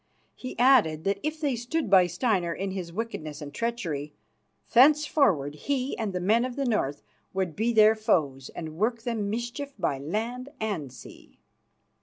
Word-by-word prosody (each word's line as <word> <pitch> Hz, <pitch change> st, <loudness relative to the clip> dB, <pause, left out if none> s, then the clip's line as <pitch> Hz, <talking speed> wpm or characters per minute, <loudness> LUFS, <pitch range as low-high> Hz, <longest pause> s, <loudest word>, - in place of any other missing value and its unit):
He 255 Hz, -, -8 dB
added 230 Hz, -, +4 dB
that 200 Hz, 0 st, 0 dB
if 310 Hz, +1 st, -3 dB
they 285 Hz, -5 st, 0 dB
stood 250 Hz, +5 st, -2 dB
by 190 Hz, -2 st, +6 dB
Steinar 180 Hz, -1 st, 0 dB
in 195 Hz, 0 st, -3 dB
his 185 Hz, -3 st, -5 dB
wickedness 165 Hz, -8 st, -5 dB
and 145 Hz, -2 st, -8 dB
treachery, 170 Hz, -, -3 dB, 0.6 s
thenceforward 265 Hz, -, +4 dB
he 265 Hz, -, -2 dB
and 220 Hz, -3 st, -3 dB
the 180 Hz, -, -2 dB
men 215 Hz, +6 st, +3 dB
of 250 Hz, -1 st, -4 dB
the 275 Hz, -, -1 dB
North 145 Hz, -, -1 dB, 0.3 s
would 185 Hz, -5 st, -1 dB
be 225 Hz, +3 st, +1 dB
their 215 Hz, -1 st, +6 dB
foes 145 Hz, -11 st, 0 dB
and 160 Hz, -2 st, -6 dB
work 225 Hz, +3 st, 0 dB
them 225 Hz, -4 st, -2 dB
mischief 240 Hz, +6 st, -4 dB
by 155 Hz, -8 st, -1 dB
land 230 Hz, -, -3 dB
and 190 Hz, -, -3 dB
sea. 130 Hz, -, -14 dB
215 Hz, 165 wpm, -27 LUFS, 170-245 Hz, 0.6 s, by